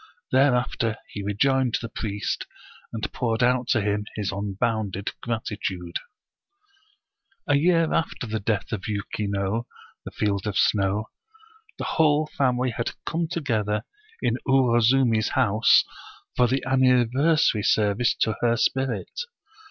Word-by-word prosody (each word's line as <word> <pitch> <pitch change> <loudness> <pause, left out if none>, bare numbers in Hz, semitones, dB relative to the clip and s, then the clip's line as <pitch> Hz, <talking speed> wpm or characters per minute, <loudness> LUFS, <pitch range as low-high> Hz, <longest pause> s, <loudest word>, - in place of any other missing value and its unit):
Thereafter 125 -4 +2
he 100 - -6
rejoined 125 +5 +1
the 115 - -5
priest, 105 -2 -4 0.4
and 110 -2 -4
poured 115 -1 0
out 125 0 +2
to 110 - +2
him 105 0 -1
his 105 -3 -2
unbounded 100 0 -2
gratitude. 100 -6 -3 1.5
A 145 - +3
year 165 +2 +3
after 160 - -1
the 110 -1 -3
death 105 0 -2
of 105 -5 -4
Yuki 105 0 -3
no, 100 +3 -2 0.2
" - - -29
the - - -5
field 100 -1 -1
of 100 - -2
snow/* 100 +1 +2 0.7
the - - -4
whole 155 -1 +2
family 125 -2 +1
had 115 +1 -3
come 165 0 -1
together 110 -11 -1 0.4
in - - +1
Uwozumi's 120 -3 +3
house, 105 +3 +4 0.5
for 125 - +4
the 130 +2 -1
anniversary 130 0 +3
service 105 +2 +2
to 110 -3 +1
her 120 -1 +2
spirit. 130 +2 -1
115 Hz, 130 wpm, -25 LUFS, 105-130 Hz, 1.5 s, house